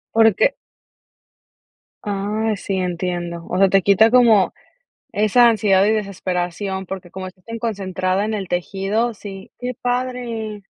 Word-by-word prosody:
Porque 225 - +4 1.5
Ah, 210 +2 -1
sí, 195 0 -4
entiendo. 175 -2 -3
O 180 - -1
sea, 195 0 +5
te 195 0 +4
quita 210 +4 +5
como 230 -6 +5 0.6
esa 215 +4 +4
ansiedad 205 -3 +3
y 215 - +3
desesperación, 190 -2 -2
porque 185 -2 -7
como 185 0 -6
estás 185 0 -15
tan 230 0 -6
concentrada 190 -3 -1
en 220 - -2
el 195 -3 -3
tejido. 195 +6 -1
Sí. 195 -2 -10
¡Qué 250 0 -3
padre! 245 -4 -3
200 Hz, 135 wpm, -20 LUFS, 185-225 Hz, 1.5 s, sea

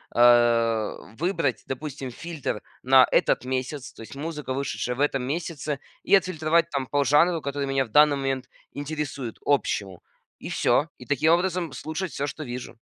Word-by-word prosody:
э, 120 -2 +4 0.2
выбрать, 165 -6 0
допустим, 135 -1 -5
фильтр 160 -6 -5 0.2
на 130 0 +7
этот - - +3
месяц, 130 +1 -3
то - - -13
есть 125 - -11
музыка, 150 -2 -4
вышедшая 130 -2 -2
в 140 - -3
этом 135 -3 +1
месяце, 150 -1 -3 0.2
и - - +5
отфильтровать 170 -3 +2
там 135 -2 -2
по 145 -1 +1
жанру, 165 +4 +4
который 140 0 -3
меня 135 0 +1
в 115 - -16
данный 150 +3 +6
момент 135 -2 -2 0.2
интересует, 145 -4 -4
общему, 100 -10 0 0.4
и - - -7
всё, 150 +2 +2
и - - -12
таким 155 +4 +3
образом 175 -3 0
слушать 160 +2 -4
всё, 140 - -2
что 155 +2 -6
вижу. 120 -1 -7
140 Hz, 165 wpm, -25 LUFS, 130-155 Hz, 0.4 s, на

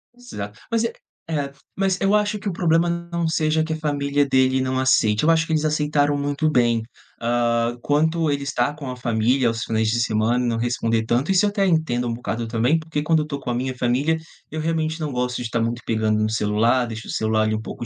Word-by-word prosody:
Exato 105 - -8
mas 230 0 +2
é 230 - -1 0.4
é 145 -3 -2 0.2
mas 190 -1 0
eu 195 +1 +2
acho 210 0 +1
que 200 0 -4
o - - -2
problema 170 -1 +2 0.2
não 170 -1 0
seja 155 0 +1
que 160 - -5
a 160 - -1
família 145 -1 0
dele 130 0 +3
não 130 0 -1
aceite, 110 -4 +3
eu 160 - +3
acho 165 0 +3
que 160 - -1
eles 155 -1 +1
aceitaram 150 -1 +1
muito 145 +2 0
bem. 120 -4 +2 0.4
Hã, 120 0 +1
quanto 160 +3 +1
ele 140 -1 -1
estar 140 0 -1
com 145 -3 -7
a 125 - -7
família 120 +2 +1
aos 115 0 -1
finais 110 -1 0
de 120 +2 +1
semana 115 +2 +1
e 120 - 0
não 115 - -1
responder 115 -1 0
tanto, 125 - +1
isso 190 +1 +4
eu 205 - +2
até 200 -1 0
entendo 155 -9 +1
um - - -1
bocado 115 0 -3
também, 115 +7 +1
porque 160 -2 -3
quando 160 +1 +2
eu - - -9
tô 140 -2 -4
com 130 - -6
a - - 0
minha 130 +1 -2
família, 130 +7 +1 0.3
eu 155 - -4
realmente 160 0 -1
não 150 -3 -3
gosto 125 0 -2
de 120 - -4
tá 115 - -1
muito 120 +1 -2
pegando 110 -1 +1
no 110 - +1
celular, 110 +3 +2
deixo 115 0 -7
o - - -5
celular 110 0 +1
ali 110 0 0
um 110 - -3
pouco 120 - -7
130 Hz, 240 wpm, -22 LUFS, 115-160 Hz, 0.4 s, isso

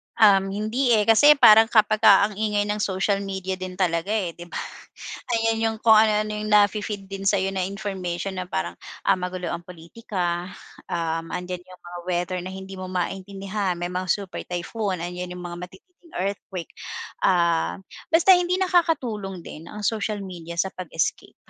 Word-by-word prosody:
Um, 195 -3 +5
hindi, 220 +5 +1
eh. 210 - +3
Kasi 260 +8 +7
parang 225 -4 +8
kapagka 215 -3 +5
ang 205 - -10
ingay 210 -1 +1
ng 210 +1 -2
social 195 0 0
media 190 -1 -4
din 185 0 -6
talaga, 175 -2 0
eh, 190 -6 -1
di 175 +1 -11
ba? - - -10 0.8
Ayan 225 0 +1
yung 225 0 0
kung 225 - +6
ano-ano 215 0 +3
yung 215 - -4
nafi-feed 210 -1 +2
din 195 0 -3
sa'yo 195 -1 +2
na 190 -1 -1
information 195 -2 -4
na 180 - -5
parang, 85 - -3 0.2
ah, - - +3
magulo 180 -1 -4
ang 170 0 -5
pulitika, 175 0 -4 0.4
um, 165 -1 -2
andiyan 180 0 -6
yung 185 0 -15
mga 175 0 -8
weather 180 +1 -1
na 180 +1 -6
hindi 190 0 -8
mo 185 - -5
maintindihan, 195 +1 -3
may 175 +1 -4
mga 185 +1 -3
super 195 0 -2
typhoon, 180 +1 -3
andiyan 180 +1 -5
yung 180 - -8
mga 175 +1 -6
matitinding 335 - -21
earthquake. 190 -2 -4 0.5
Ah, 170 -3 +2 0.3
basta 335 +3 +5
hindi 360 0 +4
nakakatulong 265 - 0
din, 160 +2 -10
ang 210 +3 -8
social 210 0 -1
media 170 -3 -8
sa 190 +3 0
pag-escape. 165 -3 -3
195 Hz, 165 wpm, -24 LUFS, 180-215 Hz, 0.8 s, parang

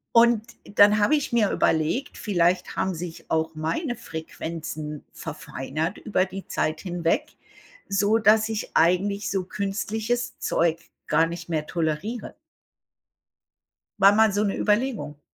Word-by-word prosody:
Und 235 -1 +6 0.2
dann 205 +1 +5
habe 210 +9 +4
ich 290 -4 -1
mir 220 -4 +3
überlegt, 160 - 0
vielleicht 180 -3 +1
haben 190 -1 -1
sich 165 0 -8
auch 160 0 0
meine 165 - -2
Frequenzen 160 -5 -6
verfeinert 155 +8 -4
über 200 -3 +1
die 190 +1 -8
Zeit 155 0 -1
hinweg, 175 -3 -1 0.5
so 205 +3 +2
dass 220 0 +4
ich 220 -1 -4
eigentlich 200 +4 +2
so 190 -2 -1
künstliches 215 +5 -2
Zeug 165 0 +1 0.3
gar 160 +1 +3
nicht 170 0 -7
mehr 155 -2 -1
toleriere. 170 +8 -3 1.7
War 195 +1 +8
mal 220 -1 +5
so 205 +1 +1
'ne 200 - -1
Überlegung. 210 - 0
190 Hz, 130 wpm, -25 LUFS, 165-215 Hz, 1.7 s, War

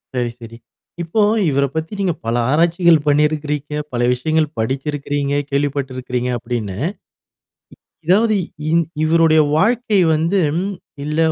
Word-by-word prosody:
சரி, 120 -1 -1
சரி. 115 0 -10 0.4
இப்போ 170 +6 0 0.3
இவர 140 0 +2
பத்தி 160 +4 -3
நீங்க 185 -3 +1
பல 115 +1 0
ஆராய்ச்சிகள் 170 +2 +4
பண்ணியிருக்கிறீங்க. 150 0 0 0.2
பல 120 -1 -2
விஷயங்கள் 155 +5 0
படிச்சிருக்றீங்க, 140 +3 -2 0.2
கேள்விப்பட்டு 140 -1 -1
இருக்கிறீங்க 125 -1 -3
அப்பிடின்னு. 110 -5 -4 1.3
இ - - -24
இதாவது 215 +5 +3 0.4
இந் 170 0 +3 0.2
இவருடைய 160 0 +4 0.2
வாழ்க்கை 220 +3 +2 0.2
வந்து, 165 +5 +1 0.6
இல்ல 150 +1 -3
150 Hz, 115 wpm, -18 LUFS, 130-165 Hz, 1.3 s, ஆராய்ச்சிகள்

